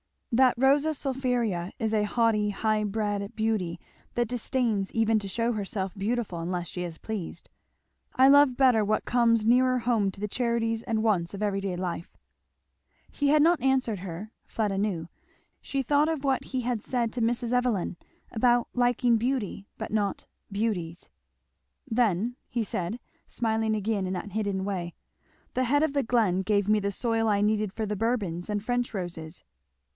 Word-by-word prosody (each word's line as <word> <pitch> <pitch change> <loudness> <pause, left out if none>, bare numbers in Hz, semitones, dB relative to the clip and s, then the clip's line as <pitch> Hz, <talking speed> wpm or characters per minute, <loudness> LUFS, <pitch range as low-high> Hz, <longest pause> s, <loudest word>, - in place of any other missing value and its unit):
"That 255 +1 +5
Rosa 280 +4 +4
sulphurea 250 - -1
is 220 0 -1
a 210 -1 +2
haughty 210 -1 +2
high 215 +1 0
bred 205 -1 -2
beauty 215 -6 -1 0.4
that 240 -2 0
disdains 235 -4 0
even 225 -1 +3
to 200 - -6
shew 230 +5 0
herself 195 -3 -3
beautiful 210 -3 -2
unless 175 0 -3
she 180 -2 -4
is 170 -2 -6
pleased; 195 -6 -6 0.7
I 260 +1 +6
love 285 -2 +6
better 250 -4 +4
what 215 +1 0
comes 230 -2 +3
nearer 255 +2 +4
home 230 -4 +1
to 195 +1 -9
the 210 - -2
charities 230 -1 0
and 220 -1 -1
wants 185 -6 +1
of 200 +1 -4
everyday 195 -2 -1
life." 175 -1 -4 1.0
He 285 - 0
had 295 +1 +5
not 335 -3 +4
answered 260 -6 +1
her, 185 +3 -7 0.2
Fleda 210 -3 -1
knew; 185 -5 -1 0.5
she 275 -1 -2
thought 290 +4 +3
of 315 -4 -2
what 270 -2 +1
he 260 -1 -2
had 240 -2 -1
said 235 -2 -1
to 245 - -2
Mrs. 235 +1 0
Evelyn 245 -8 0 0.3
about 240 +1 +2
liking 245 -1 +3
beauty 230 -4 -2
but - - -5
not 205 -2 -1 0.3
beauties. 195 -6 -2 0.8
"Then," 230 -2 +1 0.3
said 180 -2 -3
he 240 - -7 0.3
smiling 220 -1 0
again 210 -2 -1
in 185 - -2
that 190 +2 -5
hidden 200 -2 -1
way, 180 -4 -3 0.6
"the 255 - +1
head 290 +5 +3
of 315 -3 +1
the 280 -1 +1
glen 220 -6 +2
gave 205 0 +1
me 215 0 +4
the 200 0 -1
soil 225 +1 0
I 205 -2 +2
needed 210 -1 +1
for 220 - -2
the 210 0 -3
Bourbons 205 -6 -1
and 205 -1 -1
French 245 +1 -1
roses." 175 -3 -6
220 Hz, 170 wpm, -27 LUFS, 195-245 Hz, 1.0 s, I